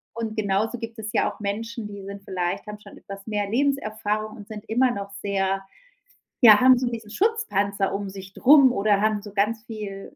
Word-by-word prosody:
und 225 -2 -4
genauso 215 +3 0
gibt 230 0 -7
es 215 -1 -5
ja - - +1
auch - - -16
Menschen, 220 +2 -4
die 200 -1 -9
sind 200 0 -8
vielleicht 180 -2 -3
haben 210 0 -7
schon - - -14
etwas 195 -1 -10
mehr 205 -2 -2
Lebenserfahrung 215 -4 -1
und 205 - -11
sind 210 -1 -8
immer 250 +3 +3
noch 200 -3 -6
sehr 195 -1 0 0.8
ja, 215 -4 +9
haben 255 0 +7
so 250 0 -1
diesen 225 -3 -7
Schutzpanzer 210 - 0
um 200 0 -3
sich 190 0 -10
drum 275 +1 +6
oder 200 -2 +2
haben 215 -1 +1
so 205 -1 -11
ganz 215 +2 0
viel 205 -4 -8
210 Hz, 195 wpm, -24 LUFS, 200-230 Hz, 0.8 s, ja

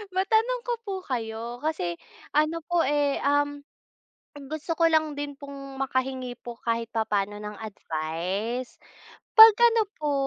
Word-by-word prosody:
Matanong 445 +6 +2
ko 485 - -1
po 395 - -3
kayo 235 -1 -4
kasi 245 - -2 0.4
ano 310 +2 +2
po, 345 0 +1
eh, 290 -1 +1
um, 290 +1 +1 0.9
gusto 310 +2 -4
ko 330 -1 +4
lang 315 -1 +2
din 290 -1 -5
pong 275 -1 -9
makahingi 260 -2 -2
po 240 -1 -8
kahit 230 0 -1
papaano 210 -2 -1
ng 210 0 -7
advice. 195 +5 -4 0.6
'Pag 445 -1 +12 0.2
ano 455 - +4 0.2
po 300 -1 -1
275 Hz, 135 wpm, -26 LUFS, 225-310 Hz, 0.9 s, Pag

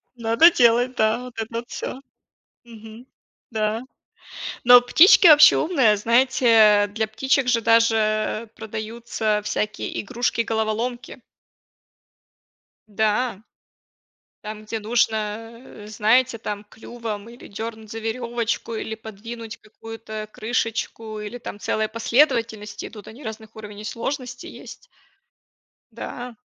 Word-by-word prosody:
надо 230 +8 +5
делать, 245 -2 +3
да, 220 0 +2
вот 250 - -10
это 225 - -3
вот 235 +1 -5
всё. 260 - -6 0.6
Мгм, 225 +1 -13 0.4
да. 220 0 -1 0.8
Но 245 0 +9
птички 340 - +6
вообще 300 -1 +8
умные. 265 -11 +3
Знаете, 225 -2 +4
для 220 +2 -2
птичек 265 +3 0
же 235 -2 +3
даже 225 -1 +2
продаются 220 0 -3
всякие 210 0 -3
игрушки-головоломки. 230 +1 -2 1.7
Да. 215 +1 -1 1.0
Там 215 0 -7
где 220 0 -4
нужно, 220 0 -1
э, 210 0 -12
знаете, 230 +3 +2
там 210 -2 -6
клювом 225 -1 -7
или 240 - -13
дёрнуть 220 +1 -7
за 225 +1 -6
верёвочку, 230 0 -3
или 220 0 -4
подвинуть 220 +1 -9
какую-то 220 0 -9
крышечку, 225 -1 -3
или 210 +3 -6
там 215 -3 -8
целая, 215 +1 -1
последовательности 230 -3 0
идут. 210 -3 -12
Они 245 +6 -12
разных 220 0 -8
уровней 210 -1 -9
сложности 245 +2 -5
есть. - - -11 1.2
Да. 245 -1 -8
225 Hz, 110 wpm, -22 LUFS, 215-240 Hz, 1.7 s, Но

